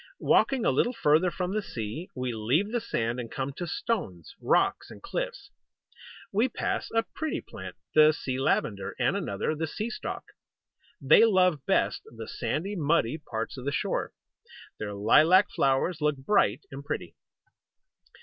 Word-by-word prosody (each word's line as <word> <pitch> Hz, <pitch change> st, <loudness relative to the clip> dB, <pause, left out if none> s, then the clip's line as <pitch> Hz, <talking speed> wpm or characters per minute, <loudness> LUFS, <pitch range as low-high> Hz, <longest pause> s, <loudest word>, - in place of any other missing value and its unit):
Walking 260 Hz, -4 st, +3 dB
a -, -, +4 dB
little 245 Hz, -, +1 dB
farther 165 Hz, -4 st, +3 dB
from 180 Hz, +1 st, -3 dB
the 215 Hz, -, 0 dB
sea, 120 Hz, -, -6 dB
we 125 Hz, -2 st, -2 dB
leave 130 Hz, -, 0 dB
the 240 Hz, -1 st, 0 dB
sand 120 Hz, -, -2 dB
and 115 Hz, -2 st, -5 dB
come 135 Hz, +1 st, -3 dB
to 175 Hz, +5 st, -5 dB
stones, 170 Hz, -, -3 dB
rocks -, -, +1 dB
and -, -, -11 dB
cliffs. -, -, -5 dB, 0.8 s
We 225 Hz, +6 st, +2 dB
pass -, -, -2 dB
a 225 Hz, 0 st, +1 dB
pretty 315 Hz, -1 st, -2 dB
plant, -, -, -9 dB, 0.2 s
the 155 Hz, 0 st, +7 dB
Sea 130 Hz, -4 st, -4 dB
Lavender, 100 Hz, -7 st, 0 dB
and -, -, +1 dB
another, 100 Hz, +9 st, -2 dB
the 160 Hz, +1 st, -3 dB
Sea 215 Hz, +9 st, -4 dB
Stock. -, -, -5 dB, 0.8 s
They 140 Hz, +9 st, +6 dB
love 185 Hz, -, +3 dB
best -, -, +1 dB
the 115 Hz, -1 st, -9 dB
sandy, 155 Hz, -, -3 dB
muddy 155 Hz, -, +1 dB
parts 115 Hz, -4 st, -5 dB
of 125 Hz, -, -8 dB
the 140 Hz, -, 0 dB
shore. -, -, -1 dB, 0.7 s
Their 105 Hz, -1 st, -4 dB
lilac 160 Hz, -, +5 dB
flowers 140 Hz, +5 st, +1 dB
look 150 Hz, -1 st, +1 dB
bright 135 Hz, -, +2 dB
and 135 Hz, +1 st, -8 dB
pretty. -, -, -5 dB
150 Hz, 160 wpm, -28 LUFS, 120-190 Hz, 0.8 s, the